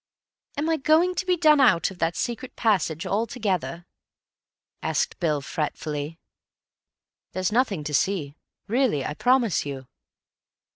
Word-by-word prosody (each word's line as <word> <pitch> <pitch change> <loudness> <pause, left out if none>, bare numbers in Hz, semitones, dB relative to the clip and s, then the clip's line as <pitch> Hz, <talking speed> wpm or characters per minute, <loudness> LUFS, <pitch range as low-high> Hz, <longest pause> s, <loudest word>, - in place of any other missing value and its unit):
"Am 295 +2 -1
I 325 -1 +2
going 315 +6 +3
to 365 - -3
be 360 -1 +3
done 305 -3 +5
out 185 -9 +4
of 185 - -13
that 165 0 0
secret 240 +2 -4
passage 185 -6 +1
altogether?" 200 -5 -2 1.0
asked 485 - -1
Bill 155 -5 0
fretfully. 150 +1 -4 1.2
"There's 185 +2 -1
nothing 215 - +1
to 150 0 -5
see, 150 -1 0 0.3
really, 230 - +1
I - - -3
promise 245 - +2
you." 135 -2 -6
195 Hz, 130 wpm, -25 LUFS, 155-260 Hz, 1.2 s, done